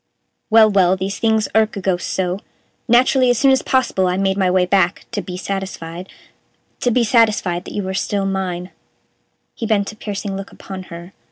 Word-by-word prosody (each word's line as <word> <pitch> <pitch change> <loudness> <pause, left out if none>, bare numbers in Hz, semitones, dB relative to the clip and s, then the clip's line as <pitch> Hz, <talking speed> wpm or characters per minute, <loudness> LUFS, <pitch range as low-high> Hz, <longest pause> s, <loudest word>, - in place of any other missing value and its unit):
"Well, 220 0 +7
well, 190 -3 +3
these 195 +2 -4
things 220 -1 +2
irk 220 -1 +2
a - - -2
ghost 185 -2 -1
so. 185 0 -1 0.5
Naturally, 255 +2 +4
as 245 - +3
soon 270 +3 +4
as 265 0 +3
possible 255 -8 +1
I 180 0 0
made 195 0 +1
my 190 -2 +1
way 180 0 +3
back 185 -1 +1
to 215 -3 -2
be 180 -2 -7
satisfied 185 -2 -5 0.7
to 245 - +1
be 240 0 +2
satisfied 215 -6 +2
that - - -8
you 205 - -2
were 190 0 -4
still 195 +1 -1
mine." 185 -2 -3 0.8
He 230 - -4
bent 205 -2 +1
a - - -14
piercing 205 -2 -5
look 195 0 -7
upon 190 -1 -9
her. 170 +2 -10
195 Hz, 190 wpm, -19 LUFS, 185-220 Hz, 0.8 s, Well